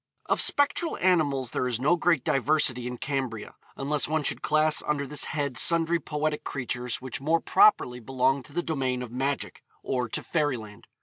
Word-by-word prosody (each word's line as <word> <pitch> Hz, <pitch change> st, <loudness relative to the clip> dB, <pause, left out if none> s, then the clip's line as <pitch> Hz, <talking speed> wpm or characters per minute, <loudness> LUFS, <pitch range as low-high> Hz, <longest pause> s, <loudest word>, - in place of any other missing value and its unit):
Of -, -, +2 dB
spectral 290 Hz, +3 st, +1 dB
animals 145 Hz, -9 st, +1 dB
there 125 Hz, -, -1 dB
is 120 Hz, -2 st, -2 dB
no 150 Hz, +7 st, +3 dB
great 165 Hz, -5 st, +1 dB
diversity 135 Hz, -3 st, +2 dB
in 125 Hz, 0 st, -5 dB
Cambria, 130 Hz, -6 st, -4 dB, 0.2 s
unless 145 Hz, +1 st, -1 dB
one 155 Hz, 0 st, -1 dB
should -, -, -1 dB
class 155 Hz, 0 st, +2 dB
under 145 Hz, -1 st, -1 dB
this 150 Hz, +2 st, -2 dB
head 145 Hz, -4 st, -2 dB
sundry 170 Hz, 0 st, +5 dB
poetic 150 Hz, -1 st, -3 dB
creatures 125 Hz, -2 st, -4 dB
which 130 Hz, 0 st, -5 dB
more 160 Hz, +4 st, +2 dB
properly 395 Hz, -, +3 dB
belong 130 Hz, +2 st, 0 dB
to -, -, -15 dB
the 175 Hz, +2 st, -1 dB
domain 130 Hz, -6 st, -2 dB
of 120 Hz, -, -9 dB
magic, 135 Hz, +3 st, -3 dB, 0.2 s
or 125 Hz, -3 st, -2 dB
to -, -, -4 dB
fairyland. 125 Hz, -10 st, -3 dB
140 Hz, 175 wpm, -26 LUFS, 125-155 Hz, 0.2 s, sundry